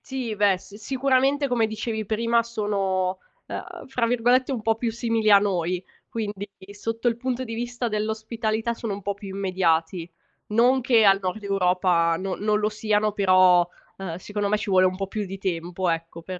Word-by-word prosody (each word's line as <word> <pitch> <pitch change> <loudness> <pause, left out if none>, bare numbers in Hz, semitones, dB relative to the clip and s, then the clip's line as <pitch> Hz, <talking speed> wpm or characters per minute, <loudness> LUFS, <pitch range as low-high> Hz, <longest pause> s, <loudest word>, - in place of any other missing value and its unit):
Sì, 255 -5 -4
beh, 200 -2 +3
s 200 +2 -15
sicuramente 270 +4 +1
come 235 -3 +1
dicevi 220 0 -3
prima 230 +2 +2
sono, 195 -5 -1 0.3
ehm, - - -7
fra 250 -3 0
virgolette 245 +3 +2
un 250 -4 -2
po' 225 - +3
più 230 +1 -2
"simili" 230 -1 0
a 200 - +10
noi. 180 -3 -1 0.3
Quindi 205 -3 -4 0.2
sotto 225 +3 -3
il 235 - +2
punto 255 +1 -2
di 230 -2 -6
vista 240 +1 -3
dell'ospitalità 220 +1 -2
sono 230 -2 -4
un 200 - -6
po' 200 - -1
più 200 0 -10
immediati. 175 -3 0 0.4
Non 245 +5 +3
che 230 -3 +4
al 195 -1 +6
nord 185 +3 -3
Europa 180 -3 +2
no 190 +1 -3
non 210 0 +1
lo 210 - +1
siano, 215 -1 0
però, 185 -3 +5 0.3
ehm, 190 -4 -5
secondo 205 +2 -3
me 210 - +2
ci 210 - -5
vuole 185 0 +5
un 185 - -2
po' 195 0 -3
più 210 +2 -3
di 195 +1 -7
tempo, 180 -1 -3
ecco, 165 0 -3
per 185 +1 -6
210 Hz, 185 wpm, -24 LUFS, 185-230 Hz, 0.4 s, a